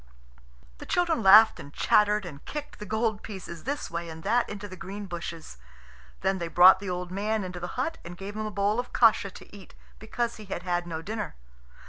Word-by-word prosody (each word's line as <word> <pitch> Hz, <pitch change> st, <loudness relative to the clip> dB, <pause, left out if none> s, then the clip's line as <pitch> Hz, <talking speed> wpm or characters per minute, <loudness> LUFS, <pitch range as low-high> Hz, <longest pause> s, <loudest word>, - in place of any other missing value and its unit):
The -, -, -9 dB
children 345 Hz, -6 st, +1 dB
laughed 215 Hz, +3 st, +8 dB
and 145 Hz, -, -10 dB
chattered 210 Hz, +5 st, +3 dB
and 145 Hz, -5 st, -9 dB
kicked 300 Hz, -1 st, -7 dB
the 210 Hz, -, -7 dB
gold 220 Hz, 0 st, -1 dB
pieces 185 Hz, -6 st, -8 dB
this 285 Hz, +3 st, -3 dB
way 170 Hz, 0 st, -4 dB
and 160 Hz, 0 st, -9 dB
that 240 Hz, +1 st, +1 dB
into 205 Hz, 0 st, -6 dB
the 185 Hz, -, -9 dB
green 195 Hz, +2 st, -7 dB
bushes. 170 Hz, -, -7 dB, 0.6 s
Then 190 Hz, 0 st, 0 dB
they 170 Hz, -, -3 dB
brought 180 Hz, +3 st, +7 dB
the 200 Hz, -1 st, -6 dB
old 180 Hz, 0 st, -4 dB
man 210 Hz, +2 st, -1 dB
into 180 Hz, -1 st, -6 dB
the 175 Hz, +4 st, -6 dB
hut 300 Hz, +6 st, -2 dB
and 175 Hz, +1 st, -9 dB
gave 200 Hz, +2 st, -7 dB
him 215 Hz, 0 st, -3 dB
a -, -, -3 dB
bowl 205 Hz, +2 st, 0 dB
of 245 Hz, -, -5 dB
kasha 220 Hz, -4 st, +4 dB
to 195 Hz, -, -14 dB
eat, 195 Hz, -2 st, -14 dB, 0.2 s
because 235 Hz, +2 st, -3 dB
he 215 Hz, -, -10 dB
had 190 Hz, -2 st, -5 dB
had 175 Hz, -1 st, -1 dB
no 165 Hz, -1 st, -5 dB
dinner. 215 Hz, -, -5 dB
200 Hz, 210 wpm, -27 LUFS, 175-220 Hz, 0.6 s, laughed